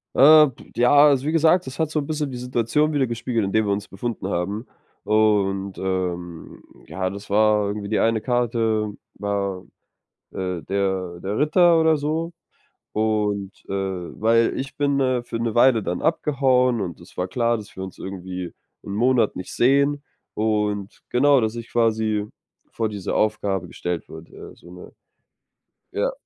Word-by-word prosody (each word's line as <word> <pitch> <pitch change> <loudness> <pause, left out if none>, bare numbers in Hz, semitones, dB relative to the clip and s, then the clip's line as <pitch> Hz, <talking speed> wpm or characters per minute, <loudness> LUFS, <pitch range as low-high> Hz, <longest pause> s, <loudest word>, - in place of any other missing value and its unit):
Äh, 155 +2 +8
p 130 - -17
ja, 120 +1 +3 0.2
also 140 -2 +2
wie 155 - 0
gesagt, 165 +2 +3
das 130 +1 -8
hat 160 -2 +1
so 155 - -1
'n 145 - -3
bisschen 150 -2 -2
die 125 - -6
Situation 125 +5 0
widergespiegelt, 120 -5 -1
in 95 - -4
der 110 0 +3
wir 100 - 0
uns 100 0 -2
befunden 100 0 -5
haben. 100 +5 -3 0.4
Und, 100 -3 +1
ähm, 90 -3 -4 0.2
ja, 95 -1 -3
das 100 +2 -9
war 105 0 +3
irgendwie 100 0 -4
die 110 - +1
eine 115 0 +2
Karte, 115 -3 0 0.2
war, 100 -2 -3 0.7
äh, 90 -2 -4
der 95 -2 -2
der 100 +3 -3
Ritter 170 +3 +4
oder 160 -1 +4
so. 160 +4 -2 0.6
Und, 105 -2 0 0.2
äh - - -5 0.5
weil 115 +1 +3
ich 135 +1 -6
bin, 140 -1 +1
äh, 130 -2 +1
für 120 - -6
'ne 115 -1 -2
Weile 120 -2 +5
dann 90 - -3
abgehauen, 130 -6 +2
und 90 -5 -5
es - - -16
war 90 +1 -2
klar, 115 +4 +1
dass 105 -2 -11
wir 95 - -5
uns 95 - -10
irgendwie 90 -2 -6 0.3
'n 100 - -6
Monat 120 +1 +2
nicht 90 - -7
sehen. 140 +3 +3 0.3
Und 105 -2 -1
genau, 140 +2 +4
dass 110 -1 -1
ich 115 0 -8
quasi 110 -2 +1 0.5
vor 110 -1 -1
diese 100 -3 -4
Aufgabe 100 -4 0
gestellt 90 -1 -4
wurde, 80 +1 -12
ja, - - -11
so 85 - -16
'ne, 90 - -12 1.0
ja. - - 0
110 Hz, 165 wpm, -23 LUFS, 100-130 Hz, 1.0 s, Äh